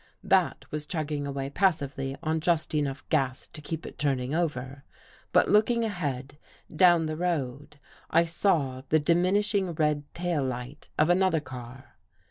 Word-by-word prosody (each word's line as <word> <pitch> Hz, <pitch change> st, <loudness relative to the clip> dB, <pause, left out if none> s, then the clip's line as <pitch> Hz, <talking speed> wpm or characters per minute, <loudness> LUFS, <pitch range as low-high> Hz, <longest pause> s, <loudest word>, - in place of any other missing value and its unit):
That -, -, +2 dB
was 150 Hz, 0 st, -4 dB
chugging 150 Hz, -3 st, -2 dB
away 140 Hz, 0 st, -4 dB
passively 140 Hz, -7 st, 0 dB
on 160 Hz, 0 st, 0 dB
just 160 Hz, -1 st, 0 dB
enough 145 Hz, -2 st, -2 dB
gas 135 Hz, -4 st, 0 dB
to 150 Hz, -, -10 dB
keep 160 Hz, +3 st, -5 dB
it -, -, -10 dB
turning 135 Hz, -2 st, 0 dB
over. 140 Hz, -5 st, -2 dB, 0.5 s
But, -, -, +4 dB
look 210 Hz, +3 st, +5 dB
ing 235 Hz, -1 st, +1 dB
ahead 145 Hz, -, -4 dB, 0.4 s
down 175 Hz, -1 st, +5 dB
the 155 Hz, 0 st, -3 dB
road, 150 Hz, -4 st, -3 dB, 0.3 s
I 165 Hz, +1 st, +4 dB
saw 160 Hz, -7 st, 0 dB
the 155 Hz, -, +5 dB
diminishing 185 Hz, +4 st, +2 dB
red 150 Hz, -2 st, 0 dB
tail 170 Hz, -4 st, -1 dB
light 130 Hz, +2 st, -5 dB
of 155 Hz, +3 st, +4 dB
another 185 Hz, -2 st, +3 dB
car. 130 Hz, -2 st, -10 dB
150 Hz, 150 wpm, -28 LUFS, 135-175 Hz, 0.5 s, look